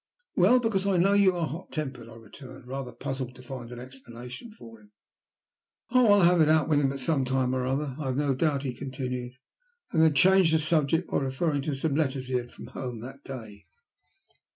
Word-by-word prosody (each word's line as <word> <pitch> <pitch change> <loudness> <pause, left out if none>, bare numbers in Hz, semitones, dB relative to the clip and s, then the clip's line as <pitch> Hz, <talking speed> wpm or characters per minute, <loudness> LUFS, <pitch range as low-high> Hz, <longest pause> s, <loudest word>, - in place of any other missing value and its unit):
"Well, 205 +8 +5
because 205 -5 0
I 195 -2 +2
know 195 +3 +4
you 200 -2 +4
are 170 -2 0
hot 160 +4 -7
tempered," 130 -6 -5
I 115 - -12
returned, 125 +3 -13
rather 130 0 -5
puzzled 130 -2 -5
to 125 - -13
find 125 -2 -8
an 125 - -8
explanation 125 - -10
for 115 - -14
him. 105 0 -22 1.0
"Oh, 250 -3 +5
I'll 205 - +5
have 175 -1 +5
it 155 - +4
out 155 -1 +3
with 150 -2 +3
him 135 -2 +1
at 140 - -5
some 135 0 +1
time 130 0 0
or 130 -1 -1
another, 135 0 -2
I 150 - -4
have 130 0 -1
no 145 -2 +1
doubt," 140 0 0
he 130 -3 -3
continued, 125 -1 -5 0.6
and 160 - +2
then 160 -2 +4
changed 180 +2 +5
the - - +3
subject 155 +1 +1
by - - +2
referring 140 +2 -1
to 145 0 -2
some 140 +2 -1
letters 135 -3 -1
he - - -3
had 125 -1 0
had 120 - -18
from - - -11
home 125 -4 -5
that 135 +3 -10
day. 110 -6 -9
135 Hz, 220 wpm, -27 LUFS, 125-160 Hz, 1.0 s, Well